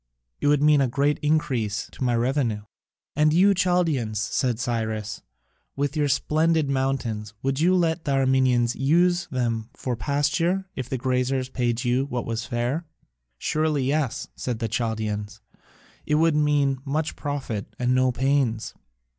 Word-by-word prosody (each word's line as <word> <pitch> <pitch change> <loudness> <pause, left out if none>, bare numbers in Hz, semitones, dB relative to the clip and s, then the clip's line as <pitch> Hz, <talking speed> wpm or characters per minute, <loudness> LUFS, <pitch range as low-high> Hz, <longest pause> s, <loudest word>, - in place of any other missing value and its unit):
It - - 0
would 145 0 +3
mean 150 -1 +5
a 135 - +3
great 140 +4 +1
increase 130 -9 0
to - - -6
my 120 -1 +2
revenue." 120 -3 0 0.5
"And 150 +1 +4
you, 190 +5 +5
Chaldaeans," 170 - +1
said 120 +1 0
Cyrus, 110 -3 -2 0.5
"with 140 +1 -1
your 150 -1 +2
splendid 155 +1 +2
mountains, 125 -6 -2
would 135 0 0
you 180 +4 +4
let 165 -2 +1
the 140 - 0
Armenians 130 -3 +2
use 175 +6 +2
them 115 -3 -2
for 125 -2 -3
pasture 150 +8 0
if 130 -2 -5
the 130 - -1
graziers 130 +1 0
paid 120 -1 -1
you 125 +2 +1
what 125 -4 -3
was 115 +1 -3
fair?" 125 +8 -2 0.5
"Surely 155 - 0
yes," 135 -1 -1
said 125 -3 -3
the 115 0 -2
Chaldaeans, 110 -3 -3 0.7
"it 150 - +2
would 160 0 +3
mean 145 -3 +2
much 150 +3 -2
profit 135 -8 -4
and 125 -1 +1
no 130 0 +3
pains." 130 -3 0
135 Hz, 150 wpm, -24 LUFS, 120-150 Hz, 0.7 s, mean